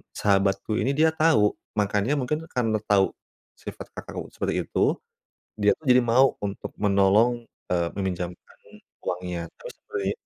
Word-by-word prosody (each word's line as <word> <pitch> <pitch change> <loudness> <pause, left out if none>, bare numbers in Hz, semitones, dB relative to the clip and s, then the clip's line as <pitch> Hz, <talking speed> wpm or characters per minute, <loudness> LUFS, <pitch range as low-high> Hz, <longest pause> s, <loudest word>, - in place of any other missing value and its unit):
sahabatku 100 +1 +1
ini 135 +2 0
dia 160 +2 +4
tahu, 155 -10 +4 0.2
makanya 105 +5 +1
mungkin 145 +4 -1
karena 115 -6 0
tahu 100 -2 +4 0.5
sifat - - -9
kakakku - - -8
seperti - - -1
itu, - - -4 0.8
dia 105 -1 +3
tuh 160 - -20
jadi 125 0 +6
mau 130 +3 +5
untuk 100 0 -5
menolong, 105 +4 +3 0.2
eee, 85 -1 +2
meminjamkan 90 -3 -5 0.4
uangnya. 90 -2 -3
Terus - - -10
dari 100 -1 -2
105 Hz, 135 wpm, -25 LUFS, 95-125 Hz, 0.8 s, jadi